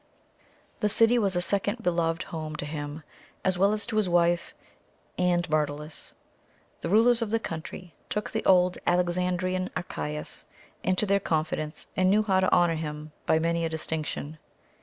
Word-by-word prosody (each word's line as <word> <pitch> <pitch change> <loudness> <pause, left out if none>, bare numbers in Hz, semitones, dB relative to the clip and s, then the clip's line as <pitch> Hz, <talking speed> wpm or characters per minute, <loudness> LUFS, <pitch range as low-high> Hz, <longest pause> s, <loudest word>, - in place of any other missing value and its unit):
The 210 - +2
city 230 +3 +5
was 195 -4 +1
a 175 - +2
second 205 +4 0
beloved 170 -1 +1
home 155 -2 -5
to 150 - -4
him, 145 0 -5 0.4
as 185 -1 +1
well 200 +2 +5
as 215 0 -2
to 215 - -3
his 210 -4 +2
wife 175 0 +2 0.6
and 180 -1 +1
Myrtilus. 150 0 -2 0.7
The 165 - -3
rulers 230 +4 +5
of 230 - -1
the 225 - +2
country 170 -3 -7 0.2
took 210 0 -2
the 220 - -2
old 180 -1 +4
Alexandrian 180 +1 +1
Archias 75 - -4 0.4
into 185 +3 +2
their 200 0 +3
confidence 155 -3 -2
and 185 0 +3
knew 210 +2 +4
how 190 -3 +2
to 190 - +2
honour 175 -2 +4
him 155 -1 -5 0.2
by - - +4
many 170 +1 0
a 165 - 0
distinction. 155 -1 -4
175 Hz, 160 wpm, -27 LUFS, 160-195 Hz, 0.7 s, city